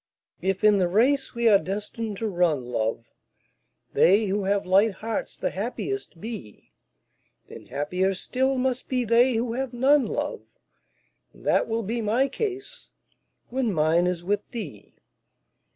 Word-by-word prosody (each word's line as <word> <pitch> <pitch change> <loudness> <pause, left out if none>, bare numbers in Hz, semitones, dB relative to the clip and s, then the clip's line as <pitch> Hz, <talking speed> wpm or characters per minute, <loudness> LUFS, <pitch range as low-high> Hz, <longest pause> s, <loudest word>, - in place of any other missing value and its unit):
If 190 +1 -1
in 210 -1 +5
the 180 - +3
race 255 +9 +2
we 235 0 +2
are 205 -3 +7
destined 205 +4 -4
to 225 - -2
run, 175 - +1
love, 115 -1 -2 0.9
They 205 +4 +5
who 200 0 -1
have 200 0 +1
light 195 +4 +4
hearts 220 +3 -4
the - - -2
happiest 245 - -4
be, 210 - -9 0.8
Then - - -11
happier 180 +7 -1
still 260 +7 0
must 255 0 -1
be 255 -1 +1
they 235 +2 +4
who 230 +1 -1
have 260 0 -3
none, 270 +3 +4
love. - - -3 0.9
And - - -18
that - - +3
will 225 0 -1
be 230 +4 -2
my 230 +6 +2
case 405 - -5 0.6
when 250 -2 0
mine 165 +1 +2
is 175 -1 -2
with 205 +3 0
thee. 180 - -8
215 Hz, 150 wpm, -25 LUFS, 185-250 Hz, 0.9 s, are